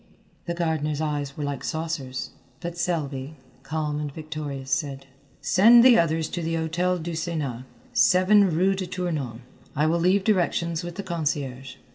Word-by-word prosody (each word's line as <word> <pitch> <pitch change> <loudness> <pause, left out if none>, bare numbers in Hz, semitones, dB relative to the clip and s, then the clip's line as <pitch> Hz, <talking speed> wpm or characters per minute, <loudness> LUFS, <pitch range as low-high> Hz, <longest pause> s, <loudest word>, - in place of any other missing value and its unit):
The 170 - -2
gardener's 155 -3 -1
eyes 145 -3 -2
were 150 - -3
like 145 -2 -3
saucers, 155 -5 -3 0.3
but 170 -1 -5
Selby, 155 -5 -2 0.3
calm 150 +1 -2
and 150 -1 -4
victorious, 150 -3 -6
said: 135 0 -1 0.4
"Send 220 +11 +7
the 250 -2 +7
others 160 -1 +1
to 175 - -4
the 165 0 -1
Hôtel 170 +2 0
du 170 - -4
Sénat, 155 -7 -3 0.3
7 200 -2 +5
rue 180 +4 +2
de 190 -1 -4
Tournon. 155 -10 -3 0.3
I 150 +1 +2
will 165 +2 +2
leave 185 +3 +3
directions 170 -5 +1
with 175 -1 -6
the 200 - -5
concierge." 140 -6 -3
160 Hz, 155 wpm, -25 LUFS, 145-175 Hz, 0.4 s, Send